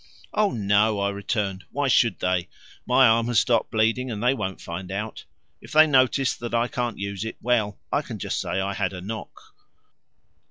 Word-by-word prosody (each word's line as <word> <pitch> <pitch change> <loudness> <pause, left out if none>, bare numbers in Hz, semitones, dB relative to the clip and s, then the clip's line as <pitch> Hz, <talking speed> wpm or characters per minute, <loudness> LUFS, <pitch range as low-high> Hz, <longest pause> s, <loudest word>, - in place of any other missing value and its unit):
"Oh 210 -1 +2
no," 105 0 +2
I 100 0 +1
returned, 100 -1 -3
"why 145 -1 -1
should 115 -7 +3
they? 90 -1 0 0.4
My 130 +1 +5
arm 115 0 +4
has 120 -2 0
stopped 120 +3 +2
bleeding, 115 +3 +1
and 110 -1 -4
they 125 +2 +4
won't 95 -6 -4
find 90 +2 -7
out. 105 +3 -5 0.4
If - - -12
they 155 +1 +8
notice 135 -2 +3
that 120 0 -4
I 115 +1 +2
can't 120 -2 -3
use 100 0 -4
it 110 - -6
well, 110 -4 0 0.2
I - - +2
can - - -7
just - - -3
say - - -2
I 100 +1 -1
had 95 -2 -2
a 90 - -7
knock." 110 +4 -7
110 Hz, 195 wpm, -24 LUFS, 100-120 Hz, 0.4 s, they